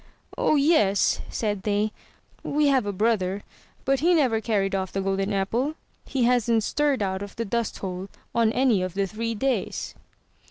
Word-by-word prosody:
0h - - +2
yes,'' 275 - +3
said 205 -3 -2
they, 210 +1 0 0.5
"we 295 0 +2
have 260 -6 +2
a - - 0
brother, 200 -1 0 0.4
but 270 0 +2
he 345 +3 +4
never 250 -8 +2
carried 200 -3 0
off 190 -1 -1
the 195 - -2
golden 195 +1 -1
apple. 230 +10 0 0.3
He 265 -3 -1
hasn't 235 -2 +3
stirred 285 -2 +1
out 190 0 -2
of 200 0 -7
the 230 - -3
dust 230 +2 -2
hole 185 0 -5 0.2
on 230 -2 +3
any 245 -5 +2
of 185 0 -3
the 200 0 +1
three 225 +3 -3
days." 265 +4 -2
220 Hz, 170 wpm, -25 LUFS, 195-255 Hz, 0.5 s, he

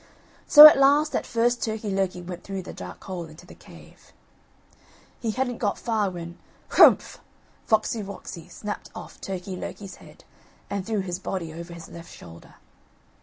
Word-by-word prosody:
So 295 0 +11
at 305 -2 +9
last 290 +3 +3
at - - -2
first 240 +1 0
Turkey 220 -2 -3
lurkey 190 -2 -2
went 180 0 -8
through 195 -1 -6
the - - -9
dark 90 0 -10
hole 180 -3 -6
into 155 0 -15
the - - -14
cave. - - -17 1.1
He 230 - -3
hadn't 245 +1 -2
got 205 -3 -1
far 220 -4 -1
when 170 -1 -9 0.3
"Hrumph," - - +5 0.5
Foxy 220 0 +1
woxy 195 -4 -9
snapped 210 -1 -7
off - - -11
Turkey 185 0 -6
lurkey's 190 +1 -8
head - - -17 0.5
and 200 -1 -2
threw 215 0 -2
his 180 -1 -5
body 175 -4 -5
over 170 +1 -9
his 170 - -11
left 170 -1 -12
shoulder. 85 0 -14
195 Hz, 165 wpm, -24 LUFS, 175-225 Hz, 1.1 s, So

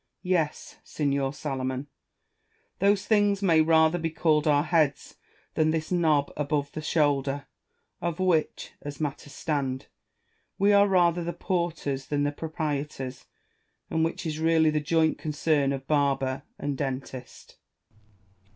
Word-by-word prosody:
Alfieri. 180 - -2
Yes, 160 -4 -2
signer 140 -2 -1
Salomon, 130 -2 -3 0.9
those 200 +1 +3
things 205 -2 +2
may 165 -4 +5
rather 160 +1 +4
be 165 0 -1
called 155 -1 +1
our 145 -1 +4
heads 155 -4 0 0.4
than 155 0 +2
this 160 +1 -2
knob 155 -5 +2
above 145 -1 -1
the 155 - -5
shoulder, 145 -3 +1 0.6
of 170 +1 -2
which 180 -4 0
(as 145 0 -7
matters 145 -1 -4
stand) 135 -4 -2 0.7
we 200 +1 +4
are 200 0 +6
rather 175 -2 +3
the 170 +1 -3
porters 170 -7 -2
than 145 -1 0
the 145 - +1
proprietors, 145 -4 -4 0.7
and 160 - +1
which 165 +2 -2
is 155 -1 -3
really 160 -1 +3
the 155 - +1
joint 160 +1 +1
concern 150 -2 +1
of 135 -1 -4
barber 135 -3 +1 0.2
and 145 -2 -3
dentist. 130 -2 -6
155 Hz, 135 wpm, -27 LUFS, 140-165 Hz, 0.9 s, are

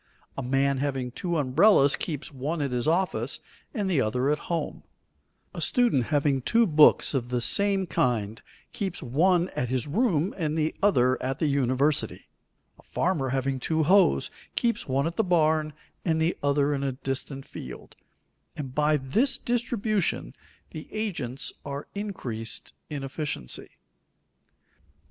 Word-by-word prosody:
A - - -3
man 135 +1 +1
having 135 -3 -2
two 175 +5 -2
umbrellas 140 +2 +5
keeps 150 -3 -5
one 145 +5 -3
at 140 - -2
his 125 +3 -1
office 180 +4 0 0.3
and 210 -7 -2
the 170 -8 +2
other 125 +5 +1
at 150 - 0
home; 170 -1 -2 0.7
a - - -6
student 240 - +2
having 145 -2 +1
two 230 - +3
books 155 -4 +5
of 125 -3 -1
the 125 0 0
same 195 +9 +2
kind 115 - -1 0.3
keeps 190 -4 -4
one 175 +8 +2
at 125 - -3
his 130 +1 -1
room 180 - +1
and 155 -3 -2
the 155 0 0
other 130 -11 +3
at 130 +1 -2
the - - 0
university; 140 +1 +1 0.5
a - - -15
farmer 160 -7 -1
having 135 0 -1
two 160 +4 0
hoes 160 - +4 0.2
keeps 235 -1 0
one 135 +1 +1
at 165 +1 -3
the 225 - +3
barn 155 -4 +2 0.3
and 160 -3 +1
the 160 +2 +1
other 145 0 +2
in 140 - -2
a 135 -1 -1
distant 135 +1 -5
field, 65 - -10 0.6
and 135 -4 -6
by 150 +1 +3
this 225 - +1
distribution 220 - -1 0.4
the 155 - -8
agents 170 - -3
are 140 0 -5
increased 130 - -4 0.2
in 145 -3 -4
efficiency. 135 - -4
145 Hz, 150 wpm, -27 LUFS, 130-180 Hz, 0.7 s, umbrellas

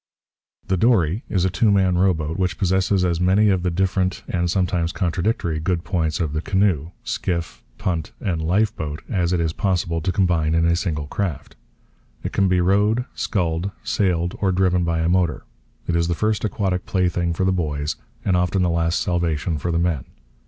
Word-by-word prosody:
The 95 - 0
dory 100 - +2
is 95 -2 +1
a 95 - +1
two 105 +4 +2
man 95 -3 +3
rowboat 85 -4 +1
which 90 0 -1
possesses 95 0 +2
as 85 -2 0
many 100 +4 +4
of 95 -2 +2
the 90 - 0
different, 95 +1 0
and 85 -1 -1
sometimes 90 -2 0
contradictory, 85 -2 -1
good 85 +1 -1
points 80 -5 -1
of 80 -4 -1
the 80 - -1
canoe, 95 -5 +1
skiff, 85 - -3
punt, 80 -4 -2
and 90 -6 -2
lifeboat 80 -4 -1
as 90 -5 +1
it 90 - +1
is 80 -1 0
possible 85 -4 0
to 95 - 0
combine 85 -4 +1
in 85 0 +3
a 85 0 +3
single 80 -6 -2
craft. 85 -1 -4 0.7
It - - -4
can 95 - +3
be 90 -1 +2
rowed, 105 +6 +2
sculled, 85 -2 -1
sailed, 90 -3 0
or 95 -2 +2
driven 90 -1 +2
by 85 -1 0
a 80 - +1
motor. 90 -2 +1 0.4
It 85 - -1
is 85 0 +2
the 85 - 0
first 110 +3 0
aquatic 95 -3 -1
plaything 90 -2 0
for 90 +3 -1
the 95 - +3
boys, 75 -4 -2 0.3
and 95 - +2
often 90 +1 +1
the 90 - +2
last 85 0 +1
salvation 85 -2 -1
for 85 - -2
the 85 - 0
men. 85 -6 0
90 Hz, 190 wpm, -22 LUFS, 85-95 Hz, 0.7 s, many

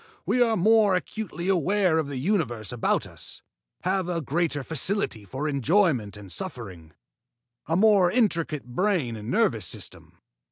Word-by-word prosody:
We 250 - +1
are 230 -2 +3
more 210 +1 +4
acutely 180 -2 -4
aware 185 -1 +2
of 155 - -2
the 140 -2 -5
universe 130 - -1
about 120 -2 0
us, - - -11 0.4
have 185 -1 0
a 170 -1 -1
greater 150 0 -1
facility 160 - -1
for 135 +10 -4
enjoyment 140 - +1
and 100 -3 -10
suffering, 85 -5 -7 0.7
a 165 - +1
more 200 -2 +5
intricate 170 - 0
brain 145 - 0
and 105 0 -7
nervous - - +1
system. - - -8
165 Hz, 145 wpm, -26 LUFS, 125-195 Hz, 0.7 s, more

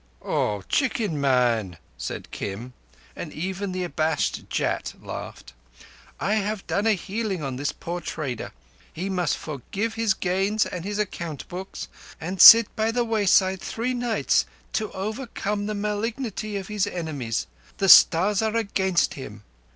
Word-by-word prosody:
"Oh, 105 -2 -1
chicken 215 - 0
man!" 120 -9 +2 0.2
said - - -6
Kim, 115 +6 -6 0.4
and - - -6
even 190 +4 -4
the 185 0 -2
abashed 160 -3 -1
Jat - - -1
laughed. - - -8 0.7
"I 200 - 0
have 210 -1 -2
done 205 +3 0
a 220 - +5
healing 195 -2 -3
on 135 -2 -3
this 145 +2 -1
poor 175 +1 -5
trader. 135 -10 -4 0.4
He 190 +4 -4
must 180 -2 0
forsake 195 - -4
his 225 -3 +1
gains 195 +4 +1
and 180 -1 -6
his 205 0 -3
account 170 -8 -4
books, 185 +2 -6 0.3
and 180 +3 -2
sit 230 -1 +10
by 220 +1 +1
the 240 +1 0
wayside 195 -4 +3
three 245 +3 -2
nights 240 -2 +1 0.3
to 215 -1 -1
overcome 210 -1 -3
the 215 - -2
malignity 210 +1 -3
of 195 -1 -6
his 210 -2 0
enemies. 145 -10 -3 0.3
The 195 - +1
Stars 190 +5 +7
are 220 0 0
against 190 -5 +1
him." 105 -6 -9
190 Hz, 145 wpm, -25 LUFS, 160-215 Hz, 0.7 s, sit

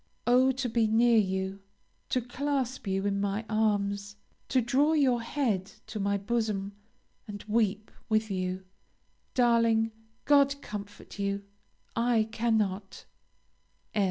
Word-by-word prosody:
Oh, 255 +2 +5
to 260 0 -2
be 230 -1 +2
near 230 +1 +4
you! 190 -1 -1 0.5
to 255 - +1
clasp 260 -1 -2
you 195 +1 0
in 200 -1 0
my 205 +2 -1
arms! 205 -2 0 0.3
to 260 - +3
draw 270 +6 +2
your 260 -6 +3
head 220 -7 -1
to 215 - -6
my 200 0 +1
bosom, 205 -2 -1 0.6
and 205 -1 -7
weep 215 -1 0 0.2
with 215 -1 +1
you! 185 0 -3 0.7
Darling, 230 -2 +3 0.3
God 280 -1 +4
comfort 205 0 -8
you, 200 0 -1 0.5
I 230 -2 +2
cannot. 210 -4 -1
220 Hz, 120 wpm, -29 LUFS, 200-240 Hz, 0.7 s, Oh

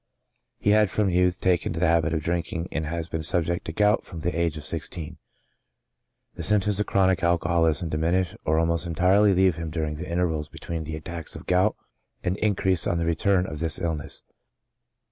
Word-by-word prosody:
He 105 - +1
had, 105 -1 +4
from 100 -1 +1
youth, 90 0 +2
taken 90 -3 +1
to 80 - -4
the 90 - +2
habit 80 -1 +2
of 80 -2 -1
drink 85 0 -2
ing, 85 +1 -3
and 80 -1 -2
has 85 +1 -3
been 80 -2 -3
subject 85 +1 -1
to - - -4
gout 105 +5 +2
from 85 -3 -8
the 85 +2 -2
age 85 -2 0
of 75 - -7
sixteen. 80 -3 -5 1.1
The - - -7
symptoms 105 -1 +3
of 105 - 0
chronic 95 -2 +2
alcoholism 85 -1 +1
diminish 85 +3 0
or 80 +1 +1
almost 85 +1 +1
entirely 95 +4 +3
leave 95 -3 +3
him 85 -1 -4
during 75 -1 -3
the 90 +3 -7
intervals 80 -3 -1
between 80 -2 -5
the 80 0 -5
attacks 85 +1 -6
of - - -9
gout, 90 +4 +2 0.5
and 90 +1 0
increase 95 -4 +1
on 85 - 0
the 85 - -1
return 90 +3 +2
of 75 -4 -5
this 80 -1 0
illness. 80 -3 -4
85 Hz, 195 wpm, -25 LUFS, 80-95 Hz, 1.1 s, had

